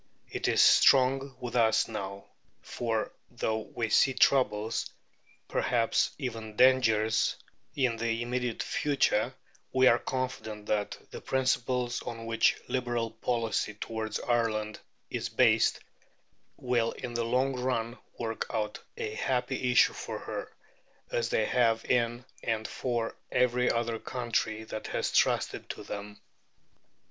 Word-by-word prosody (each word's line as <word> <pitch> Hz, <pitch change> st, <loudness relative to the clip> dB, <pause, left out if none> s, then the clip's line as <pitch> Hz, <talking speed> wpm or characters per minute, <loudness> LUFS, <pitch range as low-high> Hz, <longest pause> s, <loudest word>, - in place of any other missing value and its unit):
It -, -, -2 dB
is -, -, +5 dB
strong 135 Hz, 0 st, +5 dB
with 125 Hz, -1 st, -5 dB
us 115 Hz, -2 st, +3 dB
now, 100 Hz, -3 st, -6 dB, 0.4 s
for, 115 Hz, -2 st, -2 dB, 0.2 s
though 110 Hz, -2 st, -1 dB
we 115 Hz, +1 st, -4 dB
see 135 Hz, +3 st, +4 dB
troubles, 115 Hz, -6 st, +2 dB, 0.6 s
perhaps 115 Hz, -2 st, +1 dB
even 115 Hz, -5 st, -5 dB
dangers, 115 Hz, -4 st, +4 dB, 0.4 s
in 125 Hz, -4 st, +1 dB
the 115 Hz, 0 st, -1 dB
immediate 125 Hz, -1 st, -2 dB
future, 135 Hz, -4 st, +1 dB, 0.4 s
we 130 Hz, 0 st, +4 dB
are 120 Hz, -2 st, +6 dB
confident 110 Hz, -5 st, -4 dB
that 105 Hz, -1 st, -1 dB
the -, -, -8 dB
principles 125 Hz, -2 st, 0 dB
on 115 Hz, -1 st, -6 dB
which 115 Hz, 0 st, +3 dB
Liberal 120 Hz, -3 st, -1 dB
policy 115 Hz, -3 st, -1 dB
towards 110 Hz, 0 st, -4 dB
Ireland 110 Hz, -3 st, 0 dB, 0.3 s
is -, -, -3 dB
based -, -, +3 dB, 0.8 s
will 120 Hz, -2 st, 0 dB
in 120 Hz, -, -7 dB
the 120 Hz, 0 st, 0 dB
long 130 Hz, +3 st, +1 dB
run 125 Hz, -1 st, -2 dB, 0.2 s
work 115 Hz, -1 st, -3 dB
out 105 Hz, -1 st, -2 dB, 0.2 s
a 435 Hz, -2 st, -3 dB
happy -, -, -1 dB
issue -, -, +5 dB
for -, -, -5 dB
her, -, -, -6 dB, 0.6 s
as -, -, 0 dB
they -, -, +1 dB
have 115 Hz, -3 st, +2 dB
in 120 Hz, 0 st, +1 dB, 0.2 s
and 110 Hz, -1 st, -1 dB
for 120 Hz, -3 st, -2 dB, 0.2 s
every 125 Hz, 0 st, +2 dB
other 115 Hz, -1 st, -1 dB
country 115 Hz, -3 st, -2 dB
that 110 Hz, -1 st, -6 dB
has -, -, -1 dB
trusted -, -, +1 dB
to -, -, -6 dB
them. 105 Hz, 0 st, -7 dB
115 Hz, 130 wpm, -29 LUFS, 110-125 Hz, 0.8 s, are